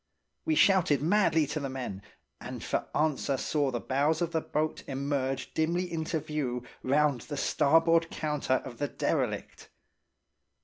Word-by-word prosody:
We 320 - +2
shouted 185 - +4
madly 165 -3 +3
to 150 +2 -3
the 140 -2 -3
men, 125 -7 -5 0.4
and - - -7
for - - -1
answer 150 -3 +1
saw 145 +1 0
the 120 -2 -2
bows 145 +6 +1
of 170 - -2
the 160 -1 0
boat 155 +1 -2
emerge 135 -1 -2
dimly 170 +3 0
into 160 0 -1
view 145 -5 -3 0.2
round 140 -1 +2
the 145 - -6
starboard 165 +4 +3
counter 150 -4 -1
of 120 -3 -9
the 145 - 0
derelict. - - -2
150 Hz, 145 wpm, -29 LUFS, 135-160 Hz, 0.4 s, shouted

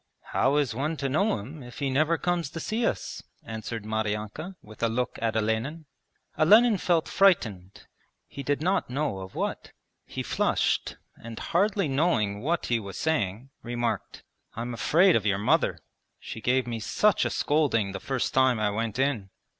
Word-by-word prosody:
'How 135 +2 +3
is 140 -6 +1
one 150 +7 -2
to 140 - -1
know 155 - +1
him 135 +9 -9
if 125 -1 -11
he 140 -2 -1
never 155 +5 +2
comes 175 0 -1
to 165 - -6
see 225 +7 0
us?' 95 - -3 0.2
answered 110 -1 -6
Maryanka, 110 - -3
with 110 0 -14
a 115 - +3
look 125 +2 -2
at 115 -1 0
Olenin. 110 +9 -1 0.5
Olenin 215 +6 +6
felt 170 -3 +1
frightened, 110 - +2 0.4
he 140 - -8
did 145 +2 -1
not 185 -3 +1
know 135 -6 -1
of 95 0 -9
what. - - -3 0.3
He - - -4
flushed - - 0 0.2
and, 115 -1 -9
hardly 195 0 +1
knowing 135 -9 +1
what 165 +5 0
he 120 -1 +1
was 100 -3 -8
saying, 120 -5 -1
remarked: 120 0 -3 0.3
'I'm 120 +1 -4
afraid 170 +9 +4
of 110 -2 +1
your 100 -1 +2
mother. 105 - +2 0.4
She 110 - -8
gave 125 +2 +2
me 115 -2 -4
such 205 - +2
a - - 0
scolding 140 -10 +1
the 95 - -5
first 135 +2 -2
time 130 -3 +4
I 105 -1 +1
went 110 +1 -2
in.' 130 -8 0
130 Hz, 170 wpm, -27 LUFS, 110-160 Hz, 0.5 s, Olenin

